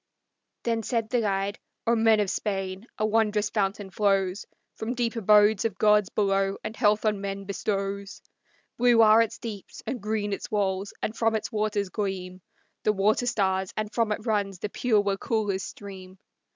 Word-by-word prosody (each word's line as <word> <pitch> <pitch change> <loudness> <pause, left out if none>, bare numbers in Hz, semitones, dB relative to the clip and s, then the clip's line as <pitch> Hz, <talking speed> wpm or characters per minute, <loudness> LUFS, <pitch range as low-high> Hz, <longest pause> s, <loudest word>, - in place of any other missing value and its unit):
Then 230 -1 0
said 225 -1 -2
the 245 - +2
guide, 200 -1 -1 0.3
"O 235 - +3
men 225 -1 +4
of 200 -2 0
Spain, 195 0 -3
a 215 - +1
wondrous 215 -1 +1
fountain 195 -2 -1
flows 195 -1 +1 0.3
From 230 +3 -4
deep 240 -1 -1
abodes 210 -1 +5
of 215 -4 -2
gods 210 -1 +4
below, 195 -1 +1
and 215 +1 -5
health 210 -1 +2
on 210 -2 +1
men 195 0 -4
bestows. 200 0 -3 0.6
Blue 240 -2 +6
are 220 +1 +7
its 230 0 -1
deeps 210 -4 -8
and 245 0 -4
green 210 -1 -1
its - - -5
walls, 195 -2 -1
and 215 - -2
from 225 -1 +1
its 220 - -3
waters 210 -2 -1
gleam 185 -3 -4 0.4
The 215 - +2
water 210 +5 +2
stars, 190 -5 0
and 215 0 -3
from 230 -2 +1
it 210 +1 -3
runs 205 -4 0
the 210 - -4
pure 220 -1 +2
Waukulla's 200 0 -1
stream. 190 -2 -9
210 Hz, 170 wpm, -26 LUFS, 195-220 Hz, 0.6 s, are